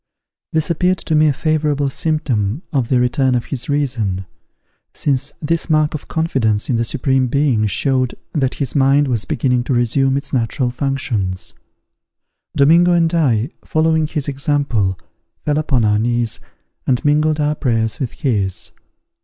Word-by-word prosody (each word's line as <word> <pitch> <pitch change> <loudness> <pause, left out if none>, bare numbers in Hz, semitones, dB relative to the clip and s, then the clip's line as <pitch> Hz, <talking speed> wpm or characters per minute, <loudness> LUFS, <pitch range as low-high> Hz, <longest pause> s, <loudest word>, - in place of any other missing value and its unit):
This 160 +1 0
appeared 180 +3 +1
to 160 - -3
me 155 0 +5
a - - +4
favourable 150 -1 0
symptom 135 - -1
of 130 -5 0
the 130 - +3
return 125 +1 +2
of 120 - -1
his 130 0 -4
reason; 120 -10 -1 0.7
since 140 0 0
this 165 +3 -1
mark 155 0 +2
of 155 - -6
confidence 130 -10 0
in 120 - +1
the 115 - +1
Supreme 130 +2 0
Being 125 -5 +1
showed 130 +5 0 0.2
that 135 -4 0
his 140 -4 -3
mind 140 +1 +3
was 120 -5 -1
beginning 125 0 0
to 130 - 0
resume 135 +3 +2
its 140 +1 -5
natural 125 +1 0
functions. 125 -8 -2 1.0
Domingo 170 +5 +5
and 165 -1 +2
I, 130 -5 +1
following 160 -1 +1
his 150 -3 -3
example, 135 -9 0 0.5
fell 150 0 +1
upon 135 -7 +1
our 105 0 +2
knees, 120 0 -1 0.5
and 125 0 +1
mingled 150 +1 +2
our 150 0 +1
prayers 115 -6 -1
with 130 -4 -3
his. 105 - -2
135 Hz, 155 wpm, -18 LUFS, 120-150 Hz, 1.0 s, me